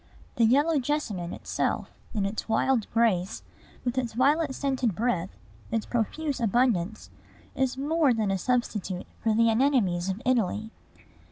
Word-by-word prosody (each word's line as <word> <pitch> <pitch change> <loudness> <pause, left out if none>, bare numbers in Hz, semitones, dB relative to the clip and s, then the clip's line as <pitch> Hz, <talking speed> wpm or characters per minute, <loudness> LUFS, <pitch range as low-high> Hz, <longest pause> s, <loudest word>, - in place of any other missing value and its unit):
The 230 - +5
yellow 290 +6 +3
jessamine 240 - -2
itself, - - -2 0.2
in 205 -2 +1
its 210 +3 -4
wild 225 0 +2
grace, 210 -6 +1 0.4
with 245 +1 0
its 240 -3 -3
violet 280 +3 +2
scented 260 -7 0
breath, 190 -5 0 0.4
its 225 -1 -1
profuse 270 +5 -2
abundance, 220 -4 +1 0.4
is 265 -1 0
more 295 +1 +2
than 220 -4 +1
a 195 - +1
substitute 210 -6 -1
for 220 -2 +1
the 230 0 +4
anemones 220 -8 +2
of 190 +2 -2
Italy. 220 -3 0
235 Hz, 140 wpm, -27 LUFS, 210-265 Hz, 0.4 s, The